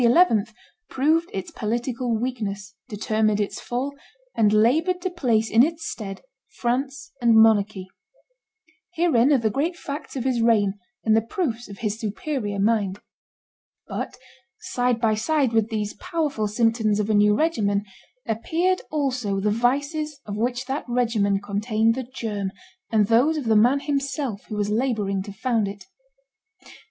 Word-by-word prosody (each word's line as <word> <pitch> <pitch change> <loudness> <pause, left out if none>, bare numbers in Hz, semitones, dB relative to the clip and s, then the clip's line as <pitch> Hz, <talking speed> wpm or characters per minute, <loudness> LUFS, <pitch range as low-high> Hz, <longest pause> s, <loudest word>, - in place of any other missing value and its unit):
proved 315 +5 +2
its 190 -1 -5
political 235 +2 -2
weakness, 210 -5 -4 0.2
determined 215 0 0
its 205 - -2
fall, 260 +4 -3 0.4
and 210 -2 +4
labored 300 - +3
to 365 +1 -3
place 235 -10 +1
in 225 - +6
its 325 +4 0
stead 195 -3 -6 0.3
France 265 +2 -2
and 235 -1 +5
monarchy. 215 -3 +4 1.1
Herein 300 -6 +3
are 285 - +6
the 225 -3 0
great 325 - -1
facts 285 -2 -7
of 255 - -2
his 250 -3 +1
reign, 215 -4 +3 0.3
and 220 -1 +4
the 225 - +4
proofs 240 - -3
of 200 - -9
his 220 -2 -3
superior 210 0 -3
mind. 205 -2 +1 0.9
But - - -5 0.4
side 245 -1 0
by 225 -2 +2
side 270 +2 +1
with 225 -1 +2
these 210 -2 -2
powerful 285 -5 -2
symptoms 220 -1 +1
of 210 - 0
a 220 - +1
new 210 0 +5
regimen 210 -10 +1 0.4
appeared 335 +12 0
also 255 -9 -1
the 210 +2 +1
vices 285 +6 0
of 205 - -5
which 245 +4 -1
that 270 +3 -3
regimen 225 -5 +1
contained 215 +2 +1
the 260 - -3
germ, 205 -5 -3 0.4
and 215 -2 +4
those 250 +9 +3
of 295 - -2
the 225 -1 +3
man 245 +6 +4
himself 275 -6 -2
who 215 - -6
was 205 0 0
laboring 215 -5 0
to 200 +1 -7
found 225 +1 0
it. 200 0 -8
230 Hz, 150 wpm, -24 LUFS, 210-270 Hz, 1.1 s, in